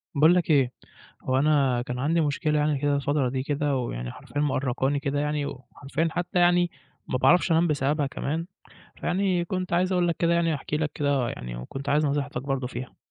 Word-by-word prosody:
باقول 160 +5 +6
لك 175 - +1
إيه، 135 -4 +4 0.5
هو 130 0 +1
أنا 135 -4 +3
كان 125 0 -5
عندي 160 +5 +1
مشكلة 150 0 +1
يعني 150 -1 +1
كده 145 +1 +1
الفترة 140 -1 0
دي 130 +1 -2
كده، 145 0 0
ويعني - - -3
حرفيًا 145 - -5
مأرقاني 135 0 0
كده 145 0 -1
يعني، 150 -1 -1
وحرفيًا 140 +5 -4
حتى 175 +2 -2
يعني 175 0 +4 0.4
ما 130 - 0
باعرفش 170 +8 +4
أنام 165 +2 +4
بسببها 145 0 +1
كمان، 155 +4 -3 0.5
فيعني 180 -1 +1
كنت 185 +1 -3
عايز 180 +2 +2
أقول 180 -1 +2
لك 170 - 0
كده 170 0 +2
يعني 170 -1 +2
أحكي 150 +1 -3
لك 155 -1 -1
كده 140 -4 +1
يعني، - - -6
وكنت 135 - -7
عايز 150 +2 +3
نصيحتك 140 -3 -2
برضو 135 -2 -2
فيها. 125 0 -7
145 Hz, 190 wpm, -26 LUFS, 135-165 Hz, 0.5 s, باقول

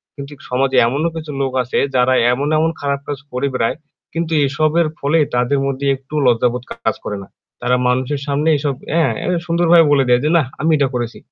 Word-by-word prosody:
কিন্তু 140 0 -8 0.2
সমাজে 130 +1 +1
এমনও 145 +7 0
কিছু 155 -2 -6
লোক 135 -1 -1
আছে 120 - -3 0.2
যারা 125 +1 +3 0.2
এমন 140 +3 -2
এমন 160 +1 +2
খারাপ 140 -1 -1
কাজ 145 -2 -4
করে 125 +3 -1
বেড়ায়। 115 -2 0 0.4
কিন্তু 165 0 -3 0.2
এসবের 155 +4 +1
ফলে 145 +4 +2 0.2
তাদের 125 +3 +1
মধ্যে 140 0 -2
একটুও 135 +3 -5
লজ্জাবোধ 120 +1 +1
কাজ - - -2
করে 105 - -4
না। - - -14 0.3
তারা 120 +1 +2
মানুষের 130 +3 0
সামনে 145 +3 +1
এসব 140 -1 -1 0.2
অ্যা 165 +1 +2 0.2
এ - - -3 0.2
সুন্দরভাবে 170 -1 +4
বলে 140 -2 +4
দেয় 125 0 +4
যে, 150 - +1
"নাহ 150 -6 +1
আমি 160 +1 +2
এটা 140 - +2
করেছি।" 120 -1 -3
140 Hz, 195 wpm, -18 LUFS, 125-155 Hz, 0.4 s, সুন্দরভাবে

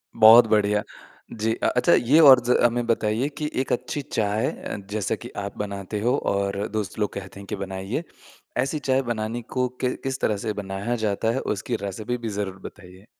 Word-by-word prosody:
बहुत 115 +2 +8
बढ़िया। 105 0 +2 0.5
जी 110 0 0
अ, - - -3
अच्छा 125 - +3
ये 135 +7 +4
और 135 -5 +9
ज 125 - +4
हमें 120 0 +2
बताइए 115 +3 +1
कि 150 -1 -2
एक - - -5
अच्छी 145 +4 -2
चाय 110 -3 -1
अ, - - -6 0.2
जैसा 105 -3 -1
की - - -10
आप 100 0 -5
बनाते 100 0 -4
हो 125 +4 +2 0.2
और 100 +1 -1
दोस्त 105 -3 -3
लोग 105 - -1
कहते 100 0 -8
हैं 100 - -11
कि 105 - -3
बनाइए, 95 - -4 0.5
ऐसी 135 +5 0
चाय 135 -1 +1
बनाने 110 +1 -3
को 125 +2 -1
कि 125 -1 +1
किस 135 -1 -2
तरह 105 -2 +1
से 105 +1 -3
बनाया 100 +3 -3
जाता 105 +2 0
है? 130 - -1
उसकी 105 +4 -2
रेसिपी 110 +5 -3
भी 115 -2 -5
ज़रूर 100 -2 -4
बताइए। 95 0 -12
110 Hz, 195 wpm, -24 LUFS, 100-125 Hz, 0.5 s, और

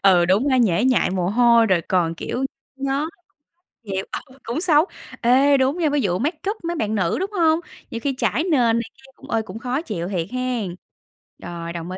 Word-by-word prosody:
Ừ, 180 -3 +6
đúng 205 +10 +3
ha, 260 - +3
nhễ 215 -3 +3
nhại 255 -7 +3
mồ 180 -1 0
hôi 235 +1 +5
rồi 185 -4 +3
còn, 170 -2 +1
kiểu, 255 +9 -3 0.3
nhó 275 +2 -1 0.8
chịu, 190 -2 -3 0.2
ừ, 260 +1 -18
cũng 240 +7 -3
xấu. 320 -2 +4 0.4
Ê, 270 +4 +5
đúng 265 +5 +1
nha, 320 -4 +2
ví 290 -1 +1
dụ 180 -3 0
make 300 +8 -1
up 435 - -6
mấy 340 +1 -2
bạn 220 -7 -1
nữ, 180 -4 +1
đúng 390 +2 -2
hông? 330 -4 +3 0.3
Nhiều 230 - -3
khi 280 -1 0
chảy 310 - +1
nền 360 - -2 0.3
này - - +1
kia, 270 0 -18
ơ, 225 - +1
cũng 225 - -8
khó 255 +4 -2
chịu 180 - -4
thiệt 170 -4 -2
hen. 250 -8 -2 0.6
Rồi, 170 -1 -6
đồng 170 +1 -6
ý. 185 - -5
240 Hz, 210 wpm, -22 LUFS, 185-280 Hz, 0.8 s, Ừ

